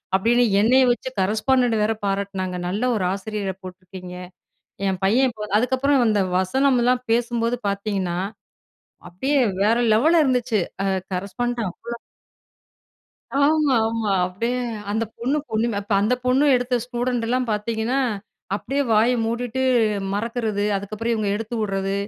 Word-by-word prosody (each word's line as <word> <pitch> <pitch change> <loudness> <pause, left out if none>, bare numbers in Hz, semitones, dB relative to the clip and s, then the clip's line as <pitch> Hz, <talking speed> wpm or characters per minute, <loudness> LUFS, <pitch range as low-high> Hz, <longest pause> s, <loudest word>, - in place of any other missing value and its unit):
அப்பிடின்னு 240 +5 +3 0.2
என்னைய 260 +4 +5
வச்சு, 240 +2 -2
கரஸ்பாண்டன்ட்ட 225 +3 +2
வேற 220 +1 +1
பாராட்டினாங்க. 195 -2 -2
"நல்ல 205 +7 -2
ஒரு 185 - -1
ஆசிரியர 200 -1 -4
போட்டுருக்கீங்க." 185 0 -10 0.7
என் 190 -1 -2
பையன் 255 +7 +4
இப்ப 210 -1 -7
அதுக்கப்புறம் 260 +1 +2
இந்த 205 -2 +2 0.2
வசனம்லாம் 250 +4 +2
பேசும்போது 235 0 0
பார்த்தீங்கன்னா, 195 -3 -2 0.9
அப்பிடியே 265 +12 0 0.2
வேற 220 +3 +3 0.2
லெவல்ல 320 +9 +4
இருந்துச்சு. 250 -4 +1 0.3
அ - - 0 0.3
கரஸ்பாண்டன்ட் 225 +4 -2
அவ்ளோ 235 +6 -8 1.4
ஆமா, 290 -1 +3
ஆமா. 225 -3 -1
அப்பிடியே 230 +7 -2 0.4
அந்த 220 +2 0
பொண்ணு 260 +5 0
பொண்ணுமே. 220 -1 0 0.2
அந்த 215 +5 +2
பொண்ணு 260 +3 +3
எடுத்த 245 0 +1
ஸ்டூடண்ட்லாம் 245 0 -1
பார்த்தீங்கன்னா, 220 +4 -1 0.6
அப்பிடியே 275 +7 -1
வாய 220 +3 +4 0.2
மூடிட்டு, 240 +2 -2 0.5
மறக்கிறது, 220 -1 -2
அதுக்கப்புறம் 215 +4 -3
இவுங்க 215 -2 -1
எடுத்து 225 +2 -5
விட்றது, 195 -1 -1
230 Hz, 120 wpm, -22 LUFS, 200-250 Hz, 1.4 s, என்னைய